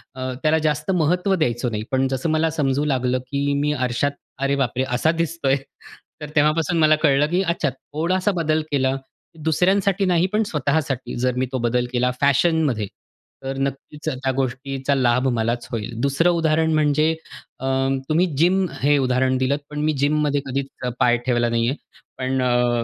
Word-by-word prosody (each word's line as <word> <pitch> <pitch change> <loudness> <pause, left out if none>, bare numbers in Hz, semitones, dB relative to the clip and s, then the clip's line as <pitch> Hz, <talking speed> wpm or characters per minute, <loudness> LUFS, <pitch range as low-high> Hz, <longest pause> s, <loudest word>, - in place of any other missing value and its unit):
अ, 130 0 -4
त्याला 155 +1 +3
जास्त 150 +4 -1
महत्व 180 +3 +2
द्यायचो 125 -6 0
नाही. 105 -2 -3
पण 130 0 +2
जसं 130 +4 -2
मला 155 +1 +2
समजू 140 +1 +1
लागलं 130 -2 0
की 140 0 0
मी 150 - +1
आरशात 130 +1 0 0.3
अरे 140 0 +2
बापरे! 130 -1 0
असा 125 +6 +2
दिसतोय. 155 -5 0 0.7
तर 150 - -6
तेव्हापासून 155 +3 +2
मला 155 0 +5
कळलं 150 -2 +3
की 180 +2 +1
अच्छा 170 -4 0
थोडासा 170 +9 -1
बदल 160 -3 0
केला, 135 -2 +1 0.5
दुसऱ्यांसाठी 190 +4 +2
नाही 180 0 +2
पण 215 +1 +3
स्वतःसाठी 140 -3 -1
जर 125 0 0
मी 130 - +1
तो 130 - -1
बदल 120 +1 +1
केला 125 +1 +2
फॅशनमध्ये 140 -5 +2 0.6
तर 135 0 -4
नक्कीच 140 +3 -4
त्या 130 -2 -2
गोष्टीचा 135 +1 -1
लाभ 125 0 +2
मलाच 115 +2 -1
होईल. 115 0 -3
दुसरं 140 +6 +2
उदाहरण 160 -1 +1
म्हणजे 155 0 +3 0.5
अ, 130 - -5 0.4
तुम्ही 165 +4 +3
जिम 185 +4 +3 0.2
हे 145 +1 +4
उदाहरण 130 -1 +1
दिलत 130 +3 0
पण 150 0 -5
मी 155 - +2
जिम 150 +2 +2
मध्ये 145 -1 +1
कधीच 135 +1 -2 0.3
पाय 120 0 +4
ठेवला 120 -2 +1
नाही 115 0 +1
आहे. 140 - -3 0.4
पण 130 0 -1
अ, 120 -1 +2
140 Hz, 170 wpm, -22 LUFS, 130-155 Hz, 0.7 s, मला